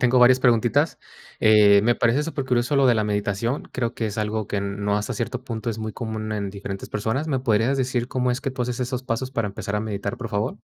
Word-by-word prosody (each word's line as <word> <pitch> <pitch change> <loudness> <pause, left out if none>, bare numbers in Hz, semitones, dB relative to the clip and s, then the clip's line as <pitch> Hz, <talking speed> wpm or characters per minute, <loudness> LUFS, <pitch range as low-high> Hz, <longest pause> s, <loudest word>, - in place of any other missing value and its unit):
tengo 125 0 +4
varias 125 +1 +6
preguntitas. 125 +6 +2 0.4
Eh, 105 -2 +6
me 120 +2 +3
parece 120 +6 +2
supercurioso 135 -4 0
lo 140 -1 +5
de 125 - +5
la 110 -1 +1
meditación, 105 +4 -1
creo 120 -2 -2
que 115 -2 -2
es 105 - -5
algo 110 0 -1
que 100 - -3
n 100 0 -3
no 105 0 0
hasta 105 +3 -2
cierto 120 +3 -4
punto 115 -2 -4
es 115 - -2
muy 110 0 -4
común 110 -2 -4
en 100 -2 -2
diferentes 100 0 -6
personas. 115 +9 -2
¿Me 135 -3 0
podrías 120 +2 +2
decir 125 -2 -1
cómo 125 -1 0
es 125 +2 -1
que 140 - -2
tu 130 -1 -3
haces 125 +1 -3
esos 125 0 -2
pasos 130 +1 -3
para 115 -5 -1
empezar 100 +1 -4
a - - 0
meditar, 100 -2 -3
por 115 -3 -6
favor? 105 +1 -1
115 Hz, 240 wpm, -23 LUFS, 105-125 Hz, 0.4 s, varias